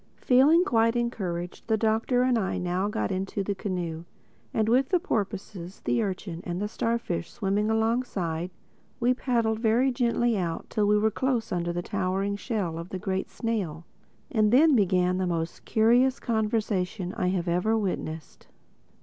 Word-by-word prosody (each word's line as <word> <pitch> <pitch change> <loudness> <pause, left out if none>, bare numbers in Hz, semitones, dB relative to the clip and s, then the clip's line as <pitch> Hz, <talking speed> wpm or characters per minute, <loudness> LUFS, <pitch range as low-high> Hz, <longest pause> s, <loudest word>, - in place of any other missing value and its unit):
Feeling 285 +7 +5
quite 230 -3 +2
encouraged, 185 -8 -3
the 220 -1 +2
Doctor 225 +3 +2
and 255 -1 +3
I 210 -5 -1
now 180 +2 -1
got 105 - -2
into 195 +1 -2
the 200 - -1
canoe; 175 -4 -4 0.5
and, 220 -1 0
with 255 +4 +3
the 365 -1 +3
porpoises, 200 - -4
the 235 - +1
urchin 185 -4 -4
and 175 0 -4
the 210 - -1
starfish 230 -6 -2
swimming 210 -1 -1
alongside, 220 -7 0 0.5
we 245 +1 +3
paddled 230 -4 0
very 235 +4 +3
gently 240 -1 +1
out 170 -2 -3
till 210 -1 +1
we 210 0 +4
were 220 +1 +2
close 245 0 -1
under 175 -1 -1
the 175 0 -3
towering 195 +1 -1
shell 200 -7 -3
of 170 +2 -7
the 190 - -4
Great 190 +1 -2
Snail. 185 -9 -3 0.5
And 215 -3 +3
then 290 +4 +6
began 185 -3 +2
the 185 - 0
most 165 -1 -3
curious 245 +4 +3
conversation 210 -5 -1
I 180 - -1
have 180 -1 -1
ever 180 +6 +1
witnessed. 165 -6 -4
210 Hz, 160 wpm, -27 LUFS, 180-230 Hz, 0.5 s, then